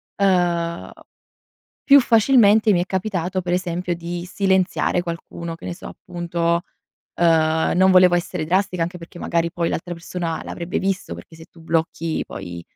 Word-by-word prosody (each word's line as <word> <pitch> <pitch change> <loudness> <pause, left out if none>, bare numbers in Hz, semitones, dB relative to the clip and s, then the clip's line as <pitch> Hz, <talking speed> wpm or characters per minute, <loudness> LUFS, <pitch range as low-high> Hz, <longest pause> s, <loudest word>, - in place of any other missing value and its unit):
Ehm, 175 -3 0 0.9
più 280 0 +7
facilmente 225 -3 +4
mi 175 - +3
è 175 - 0
capitato 190 -1 -2
per 175 -1 -4
esempio 180 0 -2
di 175 +1 -6
silenziare 190 -1 +1
qualcuno, 170 -1 -6
che - - -12
ne 175 - -5
so, - - -10
appunto, 170 -1 -2 0.5
ehm, 160 -1 +2
non 190 +1 +5
volevo 180 -1 +6
essere 175 -1 -2
drastica, 180 0 0
anche 175 +2 -2
perché 170 0 -12
magari 170 0 -1
poi 170 -1 -1
l'altra 175 +1 -4
persona 170 -1 -5
l'avrebbe 175 +3 -4
visto, 195 - -2
perché 85 - -12
se 160 - -12
tu 165 - -19
blocchi 165 0 -1
poi, 90 -3 -8
175 Hz, 155 wpm, -21 LUFS, 170-185 Hz, 0.9 s, più